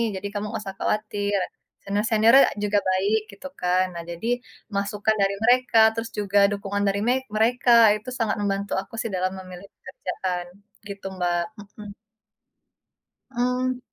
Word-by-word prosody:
jadi 190 +2 -4
kamu 205 0 -3
enggak - - -3
usah 195 -1 -7
khawatir, 205 -1 -1 0.5
senior-seniornya 220 +5 +4
juga 205 0 +2
baik," 195 +4 +2
gitu 200 +8 -9
kan. 180 +1 +2
Nah 170 - -5
jadi 170 +7 -5 0.5
masukan 205 +2 0
dari 195 0 +2
mereka, 250 +1 +3 0.2
terus 225 0 -4
juga 205 0 +2
dukungan 200 0 -2
dari 200 +1 +1
me 245 - +4 0.2
mereka 240 +3 +2 0.2
itu 215 +4 -7
sangat 225 -2 +1
membantu 200 0 -2
aku 195 - -18
sih - - -2
dalam 185 0 0
memilih 185 +1 -11
pekerjaan 180 - -5 0.4
gitu, 200 0 -8
Mbak 175 -1 0 0.2
mhm. 205 0 -11 1.4
Mmm. 250 +1 -1
205 Hz, 140 wpm, -24 LUFS, 195-225 Hz, 1.4 s, senior-seniornya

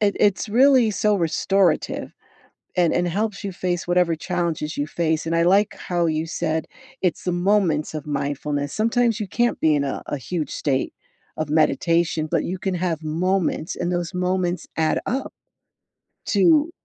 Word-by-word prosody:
it 205 -1 +2
it's 205 +2 +2
really 250 0 +5
so 210 +1 +1
restorative, 180 0 +1 0.7
and 175 -2 +3
and 175 0 +1
helps 210 +3 -2
you 200 - -2
face 175 -1 -3
whatever 175 -2 +3
challenges 170 -3 -2
you 145 - -1
face, 160 0 -1
and 165 - -1
I 170 - +3
like 200 +4 +3
how 175 -2 -1
you 160 0 -1
said, 160 -1 -2 0.4
"It's 180 -3 0
the 180 - 0
moments 175 -5 +1
of 150 -1 -5
mindfulness." 145 0 -2
Sometimes 230 0 +1
you 205 - -2
can't 240 +4 +1
be 155 -1 +4
in 145 - +1
a 135 - -3
a - - -3
huge 160 +3 -4
state 135 -3 -1 0.4
of 155 -1 -3
meditation, 160 +1 +2
but - - +1
you 185 - -3
can 190 -1 -2
have 170 -3 -2
moments, 175 +1 -1
and 175 0 -2
those 175 +1 -2
moments 180 0 -1
add 160 -1 +1
up 265 +2 -2 0.9
to 300 - +4
175 Hz, 165 wpm, -22 LUFS, 155-195 Hz, 0.9 s, really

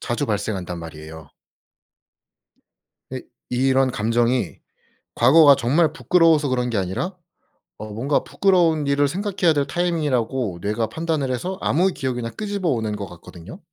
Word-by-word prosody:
자주 125 +4 -2
발생한단 100 -5 -3
말이에요. 80 -1 -10 1.8
근데 - - -6 0.3
이런 130 +1 +2
감정이 115 -1 0 0.6
과거가 140 +4 +6
정말 150 +5 +2
부끄러워서 165 -4 +3
그런 125 -1 -1
게 110 - -1
아니라 95 - -3 0.6
어 110 - -8
뭔가 130 +7 -1
부끄러운 170 -6 +2
일을 140 0 +2
생각해야 185 +1 0
될 145 -2 0
타이밍이라고 135 - -1
뇌가 110 +2 -1
판단을 155 -1 -2
해서 180 +10 -3
아무 180 +6 +2
기억이나 130 -8 -3
끄집어 200 - -3
오는 110 -6 -1
것 100 -1 -6
같거든요. 85 -1 -12
130 Hz, 330 characters per minute, -22 LUFS, 110-160 Hz, 1.8 s, 과거가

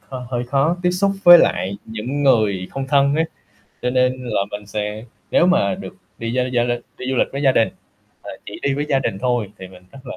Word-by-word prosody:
hơi 130 -1 -8
hơi 120 -1 -2
khó 140 +7 +1
tiếp 180 - +3
xúc 195 +2 +1
với 175 0 +11
lại 95 +2 +1
những 115 +6 -4
người 105 -9 +2
không 135 0 -4
thân 140 0 +3
á, 160 +1 +2 0.6
cho 125 - 0
nên 125 0 +1
là - - +1
mình 105 0 -6
sẽ 105 +1 -4 0.3
nếu 175 - +4
mà 190 +1 +2
được 195 - -9 0.2
đi 115 +2 -4
với 125 0 0
gia 120 -1 +2
l 120 - -1 0.3
đi - - -7
du 130 - 0
lịch - - +2
với 140 - -4
gia 135 -2 +4
đình, 115 -3 +2 0.5
mà - - -8 0.2
chỉ - - -8
đi 140 -1 +1
với 145 - -2
gia 135 - +2
đình 95 - -3
thôi 120 -3 -1
thì 95 - -9
mình 90 -1 -16
rất - - -12
là, - - -7
125 Hz, 240 wpm, -20 LUFS, 110-140 Hz, 0.6 s, với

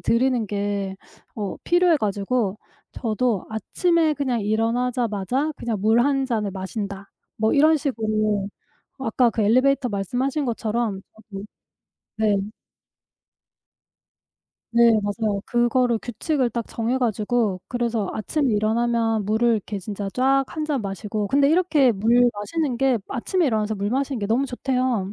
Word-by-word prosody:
들이는 240 -1 +1
게 200 -1 -2 0.4
어 205 -3 -4
필요해 350 -2 +4
가지고 205 0 -1 0.4
저도 230 -3 -1
'아침에 320 +8 +1
그냥 260 -5 -1
일어나자마자 230 - 0
그냥 230 -2 -3
물 220 +3 +4
1 270 +1 +2
잔을 220 -5 -1
마신다.' 195 0 -6 0.3
뭐 220 0 +1
이런 310 +2 +5
식으로 215 -7 -1 0.5
아까 245 -1 +2
그 225 - -2
엘리베이터 255 +5 +3
말씀하신 250 +8 -1
것처럼 225 -3 -2 0.3
저도 195 0 -6 0.7
네. 210 -2 +2 2.3
네, 235 0 +5
맞아요. 205 0 -1
그거를 240 0 +2
규칙을 250 +2 -1
딱 230 0 -3
정해 235 +3 -1
가지고 215 -4 0
그래서 235 -4 -1
아침 270 +6 -1
일어나면 225 0 +1
물을 220 +3 +2
이렇게 210 -1 -2
진짜 200 +1 -5
쫙 270 +3 +2
1 310 - -4
잔 295 -5 -1
마시고 205 +1 -3
근데 280 0 +3
이렇게 310 -7 +3
물 235 +5 +4
마시는 255 +6 -2
게 265 -3 +2
아침에 325 +7 0
일어나서 220 -2 0
물 200 +1 -2
마시는 270 -1 -1
게 205 - -2
너무 245 +6 +1
좋대요. 250 -6 -1
230 Hz, 285 characters per minute, -23 LUFS, 210-260 Hz, 2.3 s, 이런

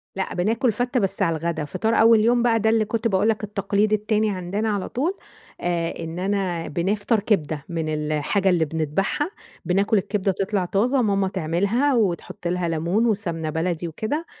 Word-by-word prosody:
لأ، 190 - -3
بناكل 225 +7 +1
فتّة 245 +4 0
بس 195 0 -1
على 165 -4 +2
الغدا، 160 -1 -2
فِطار 220 +10 -1
أول 225 0 +6
يوم 240 +2 +3
بقى 225 -2 +3
ده 220 +1 +2
اللي 220 -1 +3
كنت 230 +2 -1
باقول 205 +2 +2
لك 215 -1 -1
التقليد 205 +1 0
التاني 215 0 +1
عندنا 195 +4 -2
على 200 -2 -2
طول، 325 +10 -1 0.4
آآ 170 -1 -1
إن 165 +1 -5
أنا 190 -3 -1
بنفطر 205 +7 0
كبدة 155 -8 -1
من 165 -2 -2
الحاجة 155 +5 0
اللي 170 -3 +3
بندبحها، 160 - -1 0.3
بناكل 200 +4 +2
الكبدة، 195 0 0
تطلع 195 0 -1
طازة 240 +9 +1
ماما 200 -3 +1
تعملها، 195 - +1
وتحط 180 -4 -1
لها 180 -1 -1
ليمون 170 +8 +1
وسَمنة 170 -8 -1
بلدي 170 +1 -2
وكده، 220 - -3
195 Hz, 170 wpm, -23 LUFS, 170-220 Hz, 0.4 s, أول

